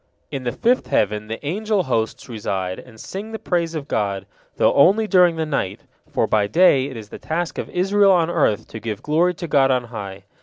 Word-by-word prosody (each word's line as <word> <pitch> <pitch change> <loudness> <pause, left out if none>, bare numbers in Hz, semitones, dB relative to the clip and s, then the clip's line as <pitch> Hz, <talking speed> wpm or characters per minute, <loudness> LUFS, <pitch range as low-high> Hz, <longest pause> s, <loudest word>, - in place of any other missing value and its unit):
In 135 -2 -5
the 120 - 0
fifth 245 - +1
heaven, 105 +1 0
the 115 +6 -6
angel 205 +4 0
hosts 115 -6 -2
reside, 95 -5 -3
and 110 - -14
sing 205 - -7
the - - -3
praise 170 -5 -1
of 145 -2 -5
God, 100 -2 -2 0.3
though - - +3
only 195 +10 +5
during 180 -4 +4
the 160 -1 -1
night, 120 -10 -2 0.3
for - - +1
by 105 -2 +1
day 140 - +4
it 130 -4 -8
is 105 -2 -9
the - - -9
task 165 +1 -3
of - - -5
Israel 195 +2 +3
on 170 -3 +3
earth 145 -11 +1
to 110 - -7
give 110 -2 -5
glory 170 +4 +2
to 170 - -6
God 135 -3 +3
on 130 -2 +2
high. 100 -2 -7
145 Hz, 215 wpm, -21 LUFS, 110-180 Hz, 0.3 s, only